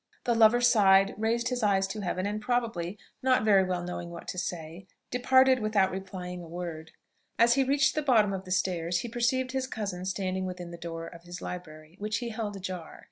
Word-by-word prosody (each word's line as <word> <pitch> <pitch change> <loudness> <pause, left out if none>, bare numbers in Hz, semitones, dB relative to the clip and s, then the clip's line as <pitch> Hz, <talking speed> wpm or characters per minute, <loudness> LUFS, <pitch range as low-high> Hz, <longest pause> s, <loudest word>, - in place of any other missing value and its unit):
The 240 - +2
lover 230 +1 +5
sighed, 195 -5 +5
raised 230 +3 0
his 250 -1 -2
eyes 195 -2 +3
to 215 - -5
heaven, 185 0 -2
and 210 +1 -2
probably, 225 -7 -1 0.2
not 255 -3 +3
very 200 -3 +5
well 180 -1 -2
knowing 175 -1 -5
what 170 0 -9
to 180 - -3
say, 175 +1 -6 0.2
departed 260 +1 +4
without 215 -3 +2
replying 185 -1 -6
a 170 - -10
word. 165 -2 -6 0.5
As 235 +2 +5
he 270 - +3
reached 275 +1 +2
the 305 - 0
bottom 225 -8 +3
of 190 -1 -4
the 185 - -12
stairs, 175 -2 0
he - - -5
perceived 245 +2 0
his 265 0 -2
cousin 200 -7 -4
standing 190 -1 -2
within 180 -1 -7
the - - -7
door 165 -1 -6
of 170 - -11
his 175 +1 -8
library, 155 -1 -8
which 210 +1 -1
he 240 -2 -4
held 215 -2 -4
ajar. 185 -4 -6
195 Hz, 205 wpm, -29 LUFS, 180-235 Hz, 0.5 s, lover